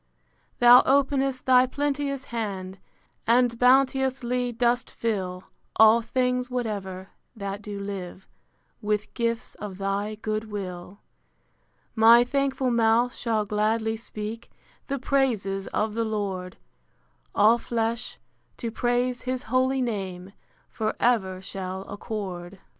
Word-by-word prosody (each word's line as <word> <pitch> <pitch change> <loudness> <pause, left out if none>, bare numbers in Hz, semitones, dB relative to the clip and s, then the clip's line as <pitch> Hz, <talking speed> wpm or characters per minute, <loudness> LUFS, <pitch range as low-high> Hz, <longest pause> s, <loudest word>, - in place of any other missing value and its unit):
Thou 245 +1 +8
openest 270 -1 +2
thy 255 0 +5
plenteous 280 0 -2
hand, 195 -4 -4 0.5
And 235 0 +3
bounteously 255 -1 +2
dost 240 +1 +1
fill 190 -5 -3 0.3
All 220 +1 +6
things 250 +1 0
whatever, 200 -6 -4 0.3
that 200 -1 -5
do 205 -1 -6
live, 190 -2 -6 0.5
With 210 0 -2
gifts 230 0 -2
of 200 -3 -8
thy 200 +2 -2
good 215 0 -3
will. 185 -1 -7 0.9
My 230 +1 +7
thankful 270 0 0
mouth 235 +1 +3
shall 220 -3 -1
gladly 220 +2 0
speak 220 0 -7 0.4
The 275 - -2
praises 230 -8 0
of 215 0 -1
the 230 +1 0
Lord: 195 -4 -3 0.8
All 220 +3 +5
flesh, 230 0 -2 0.4
to 230 - -4
praise 245 +1 0
his 255 0 -2
holy 260 +1 +2
name, 195 -5 -4 0.3
For 215 -1 -3
ever 190 -6 +1
shall 190 -1 -5
accord. 195 -3 -6
225 Hz, 115 wpm, -26 LUFS, 200-250 Hz, 0.9 s, Thou